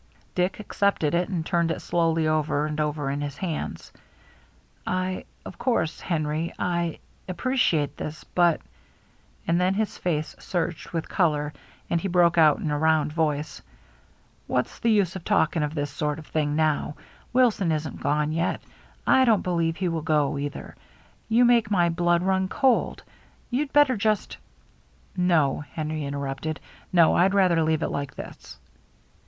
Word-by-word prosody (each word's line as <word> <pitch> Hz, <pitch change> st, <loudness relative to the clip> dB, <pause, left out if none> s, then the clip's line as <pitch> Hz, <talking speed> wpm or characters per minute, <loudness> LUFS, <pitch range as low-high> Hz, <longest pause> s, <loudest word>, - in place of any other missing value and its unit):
Dick 180 Hz, +2 st, 0 dB
accepted 200 Hz, -6 st, 0 dB
it 175 Hz, +2 st, +1 dB
and 170 Hz, -5 st, -2 dB
turned 170 Hz, -2 st, +1 dB
it 165 Hz, -, -2 dB
slowly 165 Hz, -2 st, +1 dB
over 155 Hz, -1 st, +1 dB
and 155 Hz, 0 st, -2 dB
over 150 Hz, -2 st, -1 dB
in 140 Hz, +1 st, -3 dB
his 145 Hz, -1 st, -5 dB
hands. 175 Hz, -5 st, -5 dB, 0.9 s
"I 185 Hz, 0 st, -2 dB
— -, -, -36 dB
of -, -, -9 dB
course, 235 Hz, -10 st, 0 dB
Henry 155 Hz, -1 st, -1 dB
— -, -, -29 dB
I 170 Hz, -2 st, -1 dB, 0.3 s
appreciate 175 Hz, -, 0 dB
this, 155 Hz, 0 st, -6 dB
but 175 Hz, -2 st, +2 dB, 0.3 s
— -, -, -34 dB
" -, -, -33 dB
and 170 Hz, +2 st, +2 dB
then 185 Hz, +1 st, +2 dB
his 215 Hz, 0 st, -2 dB
face 155 Hz, -3 st, -2 dB
surged 175 Hz, -2 st, -3 dB
with 165 Hz, -2 st, -3 dB
color, 150 Hz, -4 st, 0 dB, 0.3 s
and 170 Hz, -, 0 dB
he 195 Hz, -, -2 dB
broke 175 Hz, -2 st, +3 dB
out 155 Hz, -2 st, +6 dB
in 155 Hz, -, -3 dB
a 145 Hz, -, 0 dB
round 155 Hz, -1 st, +2 dB
voice: 150 Hz, -2 st, -1 dB, 0.4 s
" -, -, -35 dB
What's -, -, -1 dB
the 230 Hz, -, +1 dB
use 200 Hz, -5 st, +2 dB
of 190 Hz, -, -6 dB
talking 160 Hz, +1 st, +2 dB
of 150 Hz, +1 st, -2 dB
this 145 Hz, -2 st, -2 dB
sort 150 Hz, +1 st, -2 dB
of 160 Hz, -, -10 dB
thing 150 Hz, -2 st, -1 dB
now! 155 Hz, -1 st, 0 dB, 0.4 s
Wilson 235 Hz, -8 st, +3 dB
isn't 155 Hz, -2 st, -3 dB
gone 150 Hz, +2 st, +1 dB
yet. 165 Hz, +2 st, 0 dB, 0.5 s
I 260 Hz, -, +5 dB
don't 225 Hz, -5 st, +3 dB
believe 170 Hz, -2 st, 0 dB
he 185 Hz, -, -1 dB
will 165 Hz, -2 st, -1 dB
go 150 Hz, -2 st, +1 dB
either. 145 Hz, +1 st, -6 dB, 0.5 s
You 235 Hz, +2 st, +5 dB
make 235 Hz, -3 st, +4 dB
my 175 Hz, -4 st, +3 dB
blood 175 Hz, 0 st, +1 dB
run 190 Hz, 0 st, +1 dB
cold! 260 Hz, +5 st, +1 dB, 0.5 s
You'd 275 Hz, +3 st, -1 dB
better 290 Hz, -3 st, +5 dB
just 215 Hz, 0 st, 0 dB, 0.2 s
— -, -, -34 dB
" -, -, -36 dB
" -, -, -33 dB
No," 170 Hz, -7 st, +2 dB
Henry 155 Hz, -1 st, -3 dB
interrupted. 140 Hz, +2 st, -4 dB, 0.2 s
" -, -, -29 dB
No, 170 Hz, -3 st, +5 dB
I'd 190 Hz, +3 st, +3 dB
rather 180 Hz, -4 st, +4 dB
leave 160 Hz, 0 st, +1 dB
it -, -, -1 dB
like 140 Hz, -1 st, -4 dB
this." -, -, -10 dB
165 Hz, 175 wpm, -25 LUFS, 150-185 Hz, 0.9 s, out